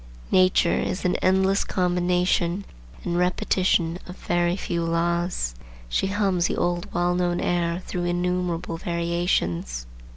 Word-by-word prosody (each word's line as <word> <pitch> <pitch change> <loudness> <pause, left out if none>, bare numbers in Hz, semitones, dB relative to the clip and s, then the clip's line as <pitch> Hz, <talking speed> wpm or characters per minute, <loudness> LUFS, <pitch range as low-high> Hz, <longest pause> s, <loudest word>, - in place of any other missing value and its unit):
Nature 185 -2 +4
is 185 - -2
an 180 - +2
endless 190 +1 +2
combination 180 0 +1 0.4
and 175 0 -1
repetition 180 -1 +1
of 180 - -8
a - - -17
very 175 0 +2
few 170 -3 -2
laws. 170 - 0 0.4
She 195 - +1
hums 195 -3 +1
the - - -2
old 175 0 -1
well 175 0 +1
known 175 -1 0
air 175 0 0
through 175 -1 -3
innumerable 175 -1 -1
variations. 170 - -1
175 Hz, 130 wpm, -24 LUFS, 170-180 Hz, 0.4 s, Nature